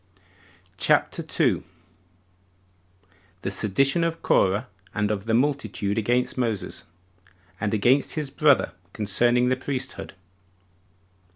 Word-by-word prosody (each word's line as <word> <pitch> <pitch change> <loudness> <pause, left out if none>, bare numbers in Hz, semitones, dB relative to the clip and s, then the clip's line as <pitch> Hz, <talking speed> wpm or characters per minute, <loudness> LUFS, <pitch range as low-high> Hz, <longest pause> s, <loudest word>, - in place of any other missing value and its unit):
CHAPTER - - +2
2. - - 0 1.8
The 95 - -2
Sedition 135 - +2
Of 165 0 -2
Corah 100 +2 +2 0.3
And 105 0 0
Of 100 -1 -3
The 110 - +2
Multitude 115 -6 0
Against 120 +4 0
Moses, 110 -7 -3 0.7
And 105 -1 -1
Against 120 +6 +2
His 150 -3 -3
Brother, 140 - +3 0.2
Concerning 120 +4 +2
The 130 - +1
Priesthood. 130 -4 -4
120 Hz, 100 wpm, -25 LUFS, 105-135 Hz, 1.8 s, Brother